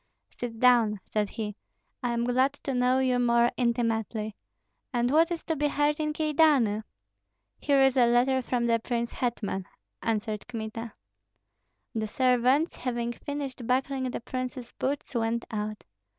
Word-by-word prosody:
"Sit 235 Hz, -2 st, -5 dB
down," 235 Hz, -4 st, +4 dB
said 210 Hz, -2 st, -1 dB
he, 210 Hz, -2 st, -5 dB, 0.5 s
"I 245 Hz, -2 st, -1 dB
am 235 Hz, 0 st, 0 dB
glad 255 Hz, +3 st, +2 dB
to 280 Hz, -1 st, -5 dB
know 250 Hz, +1 st, +3 dB
you 255 Hz, -1 st, +2 dB
more 235 Hz, 0 st, +4 dB
intimately. 225 Hz, -3 st, -1 dB, 0.6 s
And 245 Hz, 0 st, +1 dB
what 325 Hz, +3 st, +5 dB
is 345 Hz, -2 st, -3 dB
to 320 Hz, -, -1 dB
be 295 Hz, 0 st, +1 dB
heard 295 Hz, +1 st, +1 dB
in 305 Hz, 0 st, 0 dB
Kyedani?" 300 Hz, -8 st, +3 dB, 0.8 s
"Here 280 Hz, -2 st, +3 dB
is 270 Hz, -1 st, +4 dB
a 240 Hz, -2 st, +5 dB
letter 260 Hz, +2 st, +3 dB
from 245 Hz, -1 st, -1 dB
the 230 Hz, -1 st, +3 dB
prince 235 Hz, 0 st, -2 dB
hetman," 210 Hz, -6 st, -2 dB, 0.3 s
answered 215 Hz, -1 st, -2 dB
Kmita. 225 Hz, -1 st, -5 dB, 1.0 s
The 220 Hz, -2 st, -1 dB
servants, 255 Hz, -, +2 dB
having 240 Hz, -1 st, -2 dB
finished 270 Hz, -2 st, -5 dB
buckling 260 Hz, +1 st, 0 dB
the 245 Hz, -, -4 dB
prince's 255 Hz, 0 st, -5 dB
boots, 275 Hz, +1 st, -3 dB
went 235 Hz, 0 st, 0 dB
out. 215 Hz, -1 st, -4 dB
245 Hz, 150 wpm, -28 LUFS, 230-265 Hz, 1.0 s, what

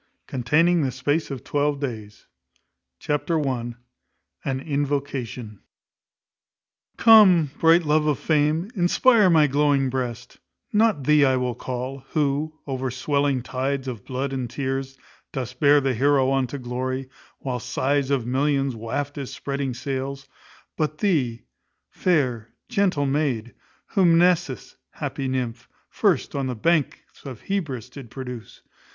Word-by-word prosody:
CONTAINING 160 Hz, +8 st, +2 dB
THE 135 Hz, -, +1 dB
SPACE 145 Hz, +5 st, -1 dB
OF 135 Hz, -5 st, -6 dB
TWELVE 145 Hz, 0 st, 0 dB
DAYS. 110 Hz, -7 st, -6 dB, 0.7 s
Chapter 150 Hz, -, -1 dB
i. 120 Hz, -2 st, -3 dB, 0.7 s
An 135 Hz, -1 st, -2 dB
Invocation. 135 Hz, -7 st, -3 dB, 1.4 s
Come, 190 Hz, -, +7 dB
bright 165 Hz, +1 st, +5 dB
love 150 Hz, 0 st, +2 dB
of 150 Hz, -3 st, +2 dB
fame, 155 Hz, +5 st, +1 dB
inspire 205 Hz, +3 st, +4 dB
my 160 Hz, -3 st, +5 dB
glowing 140 Hz, -1 st, +2 dB
breast: 125 Hz, -2 st, -4 dB, 0.3 s
not 210 Hz, -8 st, +3 dB
thee 150 Hz, +1 st, +5 dB
I 130 Hz, -1 st, +3 dB
will 125 Hz, -1 st, -1 dB
call, 125 Hz, +3 st, -5 dB
who, 150 Hz, +1 st, 0 dB
over 130 Hz, -2 st, -3 dB
swelling 135 Hz, 0 st, 0 dB
tides 135 Hz, +1 st, -2 dB
of 115 Hz, -6 st, -5 dB
blood 135 Hz, +1 st, -3 dB
and 130 Hz, -3 st, -3 dB
tears, 135 Hz, +1 st, -3 dB, 0.3 s
dost 125 Hz, -1 st, -5 dB
bear 145 Hz, 0 st, +6 dB
the 135 Hz, -2 st, 0 dB
heroe 135 Hz, +2 st, +3 dB
on 135 Hz, -1 st, +1 dB
to 140 Hz, -, -6 dB
glory, 130 Hz, +1 st, -3 dB, 0.3 s
while 125 Hz, -2 st, -4 dB
sighs 140 Hz, +3 st, 0 dB
of 135 Hz, -5 st, 0 dB
millions 135 Hz, +1 st, 0 dB
waft 140 Hz, +6 st, -4 dB
his 140 Hz, -3 st, -5 dB
spreading 140 Hz, -2 st, -3 dB
sails; 135 Hz, +2 st, -4 dB, 0.5 s
but 155 Hz, -1 st, -1 dB
thee, 140 Hz, -, 0 dB, 0.5 s
fair, 130 Hz, -11 st, 0 dB, 0.2 s
gentle 185 Hz, -8 st, +1 dB
maid, 135 Hz, -5 st, -1 dB, 0.4 s
whom 175 Hz, -5 st, +4 dB
Mnesis, 165 Hz, -, +1 dB, 0.2 s
happy 135 Hz, -, -4 dB
nymph, 125 Hz, -2 st, -3 dB, 0.2 s
first -, -, +1 dB
on 140 Hz, -2 st, -2 dB
the 125 Hz, -, -3 dB
banks 155 Hz, +4 st, -1 dB
of 130 Hz, -5 st, -8 dB
Hebrus 150 Hz, -, -3 dB
did 135 Hz, -4 st, -10 dB
produce. 125 Hz, -3 st, -8 dB
135 Hz, 135 wpm, -24 LUFS, 125-150 Hz, 1.4 s, Come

